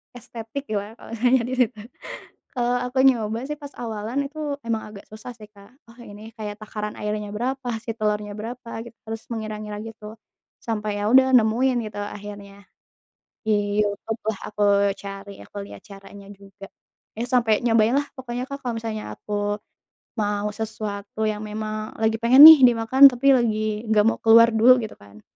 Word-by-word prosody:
estetik 235 +2 -8
gimana 205 0 -3
kalau - - -15
misalnya 245 +2 +2
di - - -3
situ. 225 0 -15 0.8
Kalau 245 0 0
aku 250 +1 -3
nyoba 225 -4 +2
sih 300 - -4
pas 285 - -9
awalan 225 +2 -4
itu 295 +3 -12 0.3
emang 225 -1 -1
agak 205 -1 -12
susah 215 +3 -10
sih 215 - -13
Kak, 200 +1 -17 0.2
oh 235 - -23
ini 215 0 -12
kayak 210 -2 -6
takaran 210 0 -6
airnya 210 0 -3
berapa, 260 +2 -3 0.2
si 230 - -3
telurnya 210 -2 -2
berapa 230 +3 -8 0.2
gitu, 235 0 -14
terus 225 0 -6
mengira-ngira 215 -2 -5
gitu. 220 -1 -10 0.5
Sampai 215 -2 -2
ya 205 - -2
udah 260 0 +6
nemuin 245 +3 +2
gitu 205 -1 -7
akhirnya 205 -1 -9 0.8
di 205 -1 0
YouTube-lah, 215 +1 -4
aku 210 0 -4 0.4
cari 200 0 -8
aku - - -16
lihat - - -12
caranya 200 0 -13
juga. 195 0 -13 0.5
Ya 235 - -1
sampai 235 -4 +2
nyobainlah, 230 +5 +2
pokoknya 250 -1 -5
Kak 280 +1 -7
kalau 240 -2 -3
misalnya 220 -1 -5
aku 205 0 -3 0.6
mau 205 0 -1
sesuatu 215 -1 -6
yang 210 - -4
memang 215 0 -5
lagi 220 0 +1
pengen 255 +4 +7
nih 320 0 +13
dimakan, 245 +3 +6
tapi 255 +3 +2
lagi 215 -2 -1
nggak 215 -1 +3
mau 225 - +1
keluar 230 +1 +6
dulu 240 +3 +5
gitu 220 - -7
kan 100 +1 -17
220 Hz, 165 wpm, -23 LUFS, 210-240 Hz, 0.8 s, nih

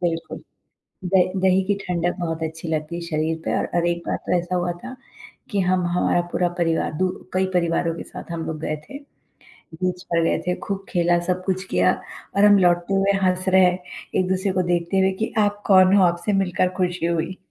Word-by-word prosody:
बिल्कुल। 165 -2 -2 0.7
द 185 0 +4 0.2
दही 190 0 +4
की 205 - +3
ठंडक 175 -1 -1
बहुत 165 -2 -3
अच्छी 160 +1 -5
लगती 155 +1 -2
है 175 - -4
शरीर 160 0 -1
पे - - 0
और - - -1
और 170 - +1
एक 170 0 -2
बार - - 0
तो - - -1
ऐसा 175 +1 -3
हुआ 175 0 0
था 255 +1 -7 0.6
कि 205 - -1
हम 185 -1 +2
हमारा 175 0 +1
पूरा 175 -1 +1
परिवार 165 -2 0
दू 185 +2 +1 0.2
कई 190 0 +2
परिवारों 170 -1 +1
के - - -6
साथ - - -10
हम 165 -1 -4
लोग 155 -1 -4
गए 155 - -2
थे। 275 - -7 0.8
बीच 180 +2 -3
पर 170 -2 0
गए - - +2
थे, 180 - +1
खूब 195 -1 -5
खेला, 175 -1 +2
सब 185 0 -1
कुछ 185 -1 -1
किया - - +3 0.4
और 200 - +5
हम 205 -1 +7
लौटते 175 +1 +2
हुए 195 +1 +3
हँस 185 0 +1
रहें, 185 -1 +5 0.4
एक-दूसरे 185 +1 +1
को 185 - +1
देखते 175 +2 +1
हुए 190 0 +3
कि, - - -3
"आप 205 -1 +1
कौन 185 -1 +6
हो? 200 - +5
आपसे 175 +3 +1
मिलकर 180 0 0
खुशी 180 -2 0
हुई।" 170 +2 -1
180 Hz, 205 wpm, -22 LUFS, 170-190 Hz, 0.8 s, हम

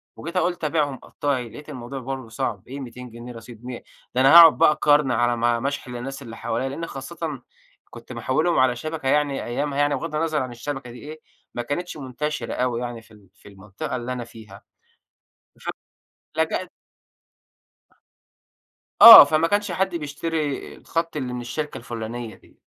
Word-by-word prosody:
وجيت 170 +3 -6
قُلت: 175 -2 0
"أبيعهم 150 -3 0
قطاعي." 130 -5 -3
لقِيت 150 +7 -12
الموضوع 130 -1 -7
برضو 130 -2 -6
صعب. 105 -2 -4
إيه 135 - -7
ال200 125 -2 -9
رصيد، 115 +1 -12
م 125 -2 -6 0.4
ده 130 - +3
أنا 135 +3 +6
هاقعد 165 -2 +9
بقى 160 -2 +5
قرن 145 -2 +4
على 120 0 +1
ما 120 0 +1
ما 135 - -2
أشحن 140 -3 -5
للناس 135 +3 -6
اللي 115 -3 -9
حواليَّا، 120 +3 -2
لإن 165 +5 -5
خاصةً 145 0 -6 0.5
كنت - - -11
محوّلهم 155 +4 0
على 130 -1 +3
شبكة 155 +2 -5
يعني 145 -1 +1
أيَّامها، 140 +4 -3
يعني 145 0 +2
بغَضّ 160 -2 -5
النظَر 155 -1 0
عن 130 -1 -4
الشبكة 135 0 -6
دي 120 - -11
إيه، 155 +1 -10 0.3
ما 120 - -3
كانتِش 150 +8 -4
منتشِرة 135 -1 -4
أوي 125 -1 -1
يعني 120 -2 -5
في 110 - -23
ال 105 -4 -19
في 100 +1 -17
المنطقة 100 +4 -7
اللي 125 +1 -4
أنا 125 -1 -5
فيها. 110 -4 -14 1.0
ف - - -7 0.7
لجَأت - - -1 2.3
آه، - - +14
فما 155 +3 +2
كانش 205 0 0
حد 185 0 -1
بيشتري، 150 -1 -3
آآ، - - -18
الخط 165 -1 -3
اللي 130 -3 -3
من 125 - -4
الشركة 150 +5 -5
الفلانية 115 -1 -6
دي. - - -24
135 Hz, 170 wpm, -23 LUFS, 120-150 Hz, 2.3 s, آه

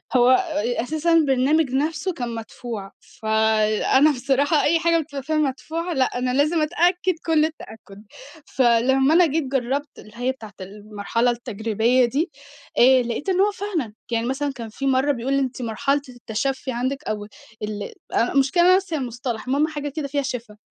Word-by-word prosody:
هو 245 0 +5
آآ 300 -6 +1
أساسًا 315 +5 0
البرنامج 290 -1 +3
نفسه 305 +6 -1
كان 245 -7 -4
مدفوع. 225 -2 -7
فَأنا 220 +6 +2
بصراحة 280 +3 +1
أي 330 +2 +3
حاجة 335 0 +2
بتبقي 285 -3 -6
فيها 315 +3 -2
مدفوعة 315 +4 -2
لأ، 260 -3 0
أنا 250 0 -1
لازم 305 +5 +2
أتأكِّد 350 +3 +1
كل 315 -2 +3
التأكُّد. 220 -9 -9 0.4
فلمّا 265 +3 +3
أنا 350 +1 +6
جيت 315 0 0
جرّبت 270 +2 -2
اللي 215 - -14
هي 245 +2 0
بتاعة 220 -6 -11
المرحلة 210 +4 -2
التجريبية 235 +1 +1
دي، 295 +8 -1 0.5
آآ 255 +1 +6
لاقيت 240 +9 -3
إن 370 -1 +1
هو 410 +1 +3
فعلًا. 350 - -4 0.2
يعني 230 0 0
مثلًا 275 +3 -2
كان 230 -4 -7
في 275 +5 -4
مرة 270 +2 +2
بيقول 255 +1 -2
لي 275 - +3
أنتِ 260 -2 -3
مرحلة 275 +5 0
التَشفّي 255 +3 -3
عندِك 260 +4 -2
أو 210 -4 -4 0.4
ال 210 -1 -5 0.2
أ 235 - +1
المشكلة 275 +6 +3
إن - - +5
أنا 365 - +7
ناسية 375 -4 -1
المصطلح، 245 -3 -4
المهم 285 +4 +2
حاجة 295 -2 -4
كده 285 0 -4
فيها 285 +1 -1
شِفا 240 -5 -6
265 Hz, 170 wpm, -22 LUFS, 235-305 Hz, 0.5 s, أنا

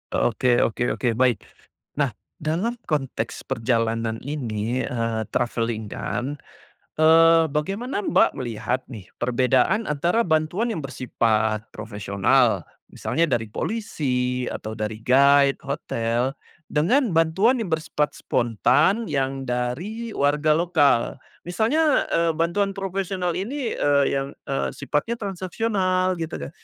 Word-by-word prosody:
Oke 120 +1 +2
oke 120 +2 0
oke 120 - 0
baik, 125 -3 +2 0.5
nah - - +1 0.2
dalam 180 +11 -1
konteks 135 -7 -2
perjalanan 115 -1 -1
ini, 125 -4 -2
eee, 115 -2 -2
travelling 115 -3 -1
kan, 135 +6 -4 0.6
eee, 165 +1 +6
bagaimana 195 - -2
Mbak, - - +3
melihat 125 0 -3
nih 105 -7 -9 0.2
perbedaan 125 - +2
antara 170 +10 +1
bantuan 175 +8 0
yang 155 - -4
bersifat 110 -5 -1
profesional 105 - +1 0.2
misalnya 165 +2 -1
dari 115 - -7
polisi 125 - -2
atau 110 +1 -5
dari 110 0 -3
guide 140 +3 +5
hotel, 125 -1 -1 0.3
dengan 240 - +2
bantuan 190 +10 +3
yang 185 - -5
bersifat 160 -2 0
spontan 130 - +1
yang 135 -2 -2
dari 165 - -3
warga 150 0 +2
lokal, 140 -7 +2 0.2
misalnya, 260 - +2
eee, 165 0 +2
bantuan 185 +5 0
profesional 190 -2 -2
ini, 245 +4 -3
eee, 140 -1 +3
yang, 135 0 -2 0.2
eee, 135 - -1
sifatnya 190 +11 -1
transaksional 185 -2 -1
gitu 165 0 -4
kan - - -6
145 Hz, 115 wpm, -23 LUFS, 120-180 Hz, 0.6 s, eee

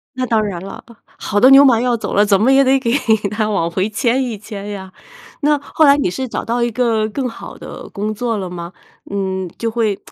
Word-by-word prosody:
那 255 0 -1
当 225 -2 +2
然 180 -4 -4
了， 195 0 -9 0.3
好 205 - -1
的 255 +5 +7
牛 275 +1 +8
马 235 -4 +4
要 245 -1 +1
走 - - -5
了， 205 - +4
怎 200 -2 +3
么 235 +6 +3
也 270 +1 +5
得 270 0 +3
给 235 -3 -1 0.4
她 215 0 -1
往 170 -5 0
回 185 +4 -1
牵 240 +4 0
一 235 -4 -4
牵 205 -1 -8
呀。 190 -2 -7 0.5
那 295 0 +3
后 295 +2 +1
来 280 0 +6
你 280 - 0
是 260 +9 -4
找 - - -4
到 235 +1 -1
一 240 - +1
个 225 -2 0
更 260 +4 -3
好 235 - -9
的 - - -10
工 210 +1 -3
作 225 0 -2
了 185 -2 -4
吗？ 170 -1 -7 0.4
嗯， 190 -2 -3
就 230 -1 -2
会， 220 -3 -1
220 Hz, 250 characters per minute, -17 LUFS, 200-250 Hz, 0.5 s, 牛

